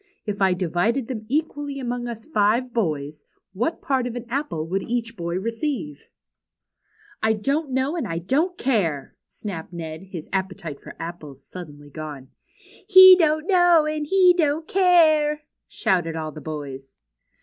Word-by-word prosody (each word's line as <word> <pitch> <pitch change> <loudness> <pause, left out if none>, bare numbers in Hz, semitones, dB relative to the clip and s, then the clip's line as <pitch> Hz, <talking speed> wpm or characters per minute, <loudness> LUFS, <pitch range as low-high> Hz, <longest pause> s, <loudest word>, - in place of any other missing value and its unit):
If 205 -2 -4
I 190 -2 +4
divided 190 +8 0
them 220 -4 -5
equally 290 -1 -2
among 245 -1 -3
us 230 -1 -7
five 235 -1 +1
boys, 155 -9 -2 0.3
what 240 - -2
part 260 -3 0
of 240 - -6
an 245 0 -6
apple 240 - -3
would 190 +3 -1
each 230 +2 -3
boy 170 -2 -3
receive? 225 - -4 0.4
' - - -64
' 425 - -27
''I 220 -1 +2
don't 280 +6 0
know 265 +4 0
and 320 -10 -2
I 165 -2 -3
don't 300 - 0
care," 175 - -1
snapped 180 -6 -7
Ned, 165 0 -7
his 170 -5 -7
appetite 185 -6 -3
for - - -11
apples 155 -5 -8
suddenly 145 -5 -11
gone. 145 -3 -8 0.6
"He 375 -2 +10
don't 310 -3 +1
know 350 -4 +5
and 305 -1 -2
he 370 +1 +5
don't 315 -1 0
care!" 310 -5 +4 0.2
shouted 175 -3 0
all 155 -1 -4
the 155 - -10
boys. 140 -4 -7
225 Hz, 160 wpm, -23 LUFS, -, 0.6 s, He